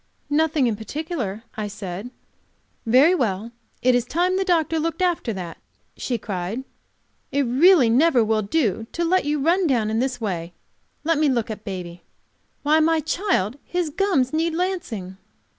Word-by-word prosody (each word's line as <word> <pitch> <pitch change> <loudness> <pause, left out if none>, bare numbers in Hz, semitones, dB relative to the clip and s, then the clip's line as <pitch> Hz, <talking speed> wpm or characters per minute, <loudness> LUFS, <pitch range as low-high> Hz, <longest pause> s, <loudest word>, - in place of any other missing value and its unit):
"Nothing 310 -2 +2
in 230 -3 +1
particular," 225 - -4
I 215 -1 -3
said. 200 +1 -6 0.8
"Very 265 +9 +6
well, 225 - -1 0.3
it 255 0 +5
is 245 -1 +2
time 350 +8 0
the 385 - +1
doctor 330 -3 +1
looked 330 +3 -1
after 345 -9 0
that," 180 -4 -7 0.4
she 245 - -2
cried. 200 +3 -4 0.7
"It 280 0 +2
really 275 +3 +5
never 255 +1 +4
will 215 0 +1
do 225 - 0
to 340 - -1
let 370 0 +2
you 295 0 0
run 340 +5 +2
down 230 -6 +1
in 220 - 0
this 255 0 -1
way. 175 -6 -3 0.5
Let 325 -1 +1
me 305 -2 +3
look 235 -4 0
at 215 -1 -7
baby. 180 -4 -6 0.6
Why, 305 +2 +4
my 325 +1 +3
child, 300 - -1
his 350 -3 -2
gums 300 -8 +1
need 320 +1 0
lancing." 265 - -3
260 Hz, 160 wpm, -23 LUFS, 215-325 Hz, 0.8 s, Very